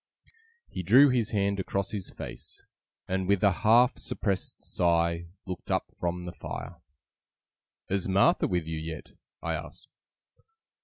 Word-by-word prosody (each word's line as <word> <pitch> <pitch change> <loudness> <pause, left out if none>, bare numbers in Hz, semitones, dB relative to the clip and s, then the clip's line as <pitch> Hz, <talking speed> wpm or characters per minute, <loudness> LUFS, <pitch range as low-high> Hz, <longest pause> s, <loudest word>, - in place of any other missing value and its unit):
He - - -5
drew 125 +11 +7
his 120 -4 +1
hand 100 -1 0
across 100 +1 -2
his 100 -4 -4
face, - - -8 0.4
and 95 0 -1
with 100 0 +2
a 100 - +6
half 115 +7 +4
suppressed 100 -3 -2
sigh 85 0 +1 0.2
looked 90 -2 -7
up - - 0
from 90 0 -2
the 90 - -6
fire. 85 -1 -7 1.1
'Is 95 -1 0
Martha 95 +1 +4
with 90 -3 -1
you 80 0 -4
yet?' 80 -1 -7 0.3
I 85 - -1
asked. 80 +1 -7
95 Hz, 140 wpm, -28 LUFS, 85-100 Hz, 1.1 s, drew